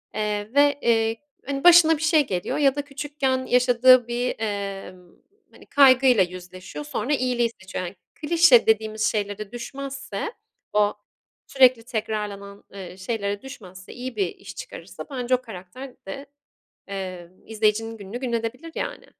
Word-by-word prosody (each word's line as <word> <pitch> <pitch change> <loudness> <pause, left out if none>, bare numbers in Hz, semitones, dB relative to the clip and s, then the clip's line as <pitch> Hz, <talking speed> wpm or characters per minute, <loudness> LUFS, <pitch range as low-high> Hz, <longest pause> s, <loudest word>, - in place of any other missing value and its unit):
eee, 210 0 -2
ve, 285 0 +4
eee, 225 -1 +2 0.3
hani, 275 0 -4
başına 335 -2 +7
bir - - -9
şey 315 -3 +3
geliyor 180 -2 -2
ya 275 -2 +3
da 290 - -1
küçükken 280 -2 -2
yaşadığı 250 0 +5
bir, 240 +1 -2
emm, 195 -4 -5 0.4
hani, - - -17
kaygıyla 260 -5 +5
yüzleşiyor, 185 +8 -8
sonra 295 -1 -2
iyiliği 250 -3 +1
seçiyor. 190 -1 -5
Hani, 180 +3 -8 0.3
klişe 310 -6 +5
dediğimiz 220 0 +1
şeylere 205 -1 -4
düşmezse, 275 - -6 0.4
o 210 0 +3 0.5
sürekli 255 -3 +4
tekrarlanan, 210 -3 -5
eee, 185 -2 -9
şeylere 200 0 -3
düşmezse, 185 -8 -11
iyi 250 0 -7
bir 195 -3 +1
iş - - -11
çıkarırsa - - -9
bence 255 -1 0
o 250 - -4
karakter 230 +4 -10
de, 275 +8 -7 0.6
emm, 185 -2 -8
izleyicinin 225 +1 0
gününü 205 +3 -7
gün 250 -2 -3
edebilir, 235 +8 -4
yani. - - -5
230 Hz, 140 wpm, -24 LUFS, 200-270 Hz, 0.6 s, başına